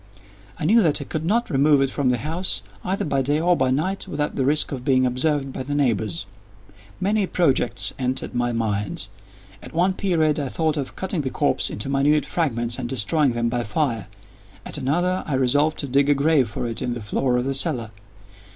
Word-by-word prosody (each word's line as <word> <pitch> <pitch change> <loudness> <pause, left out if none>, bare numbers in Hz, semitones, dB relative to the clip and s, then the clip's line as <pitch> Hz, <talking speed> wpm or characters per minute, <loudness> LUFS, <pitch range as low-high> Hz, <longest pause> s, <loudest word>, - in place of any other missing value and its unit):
I - - -3
knew 225 +7 +5
that 160 -7 +2
I - - -4
could 155 0 -4
not 230 +7 +1
remove 145 +1 +4
it 135 -1 +1
from 140 -3 0
the 125 - +2
house, 160 +9 -2 0.2
either 190 +2 -1
by 140 -3 +1
day 145 +3 +1
or 175 +2 +3
by 130 -5 +1
night, 170 +9 -1
without 150 0 -2
the 135 - 0
risk 150 +2 +2
of 130 -3 -5
being 130 -1 +3
observed 135 +2 0
by - - -5
the 145 +2 -3
neighbors. 110 - 0 0.7
Many 200 +1 +1
projects 125 - +2
entered 130 0 -2
my 120 0 0
mind. 105 -4 -2 0.5
At - - -11
one 180 +3 +3
period 160 -6 +1
I 140 -2 -2
thought 160 +1 0
of 140 -3 -4
cutting 190 -3 -2
the 135 - -2
corpse 145 +2 +1
into - - -5
minute 140 +2 +2
fragments, 120 -7 -1
and 120 -2 -4
destroying 135 +3 +1
them 120 0 0
by 120 0 -1
fire. 115 - -1 0.6
At - - -5
another, 175 +7 0
I 145 - -1
resolved 145 +4 +2
to 140 - -4
dig 140 +2 +2
a 145 - +5
grave 140 -3 +3
for 105 - -4
it 115 -1 -4
in 120 - -1
the 120 - -6
floor 125 +4 0
of 125 - -1
the 135 - -1
cellar. 135 -6 -1
140 Hz, 205 wpm, -23 LUFS, 125-155 Hz, 0.7 s, knew